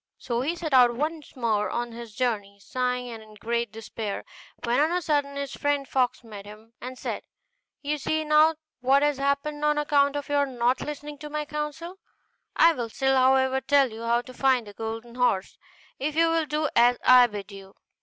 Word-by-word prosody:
So 240 -1 -2
he 310 +6 -1
set 325 -4 -4
out 245 -2 +6
once 305 +3 -4
more 220 -4 0
on 240 0 -3
his 230 -2 -10
journey, 210 -6 -2
sighing, 250 +3 -2
and 225 -1 -8
in 215 -1 -15
great 235 +1 -2
despair, 220 -2 -6 0.4
when 240 +2 +1
on 305 +2 +3
a 355 - +1
sudden 290 -4 -1
his 280 -1 -4
friend 290 -1 0
the - - -25
fox 255 -2 0
met 210 -3 -10
him, 210 +2 -14
and 255 +1 -7
said, - - -4 0.6
'You 295 +1 -1
see 315 +3 -1
now 305 +1 +5 0.2
what 270 +3 +3
has 295 -2 +2
happened 280 +2 -1
on 300 0 +2
account 285 -1 +2
of 290 -1 -4
your 285 -1 +1
not 250 0 0
listening 295 0 -6
to 300 - -8
my 300 0 -3
counsel. 300 +5 -5 0.6
I 335 0 +6
will 240 -6 -4
still, 265 +3 +1
however, 265 0 +3
tell 275 -3 +3
you 220 +1 -9
how 235 +1 +1
to 255 - -12
find 255 -2 +2
the 205 - -11
golden 225 +2 -6
horse, 240 -6 0 0.4
if 295 +2 -2
you 330 0 +3
will 325 -1 +1
do 305 +1 0
as 240 +1 +5
I 250 -1 +8
bid 205 -2 -8
you. 195 -1 -12
260 Hz, 205 wpm, -26 LUFS, 235-295 Hz, 0.6 s, I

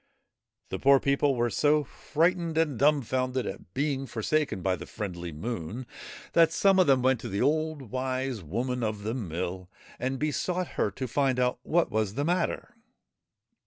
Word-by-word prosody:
The 95 - -3
poor 140 0 +6
people 140 0 +2
were 120 -1 +1
so 150 +4 +3
frightened 165 +3 0
and 150 -7 +1
dumbfounded 130 -3 +1
at 95 -2 -7
being 135 -1 -1
forsaken 120 - -1
by 95 -1 +2
the - - -9
friendly 90 -4 -5
Moon, 110 +6 -5 0.5
that 165 -1 +5
some 195 +3 +4
of 185 - +5
them 130 -2 +4
went 130 -2 +3
to - - -6
the 100 +4 0
old 155 0 0
Wise 130 -2 -2
Woman 120 - -2
of 105 -2 -2
the 110 +2 -2
Mill 90 -4 -4 0.3
and 130 +1 -1
besought 175 +5 -1
her - - 0
to 130 +7 -5
find 130 +1 +1
out 125 -1 +1
what 170 +6 +1
was 105 -1 0
the 145 +2 0
matter. 180 +7 -1
130 Hz, 165 wpm, -28 LUFS, 110-150 Hz, 0.5 s, poor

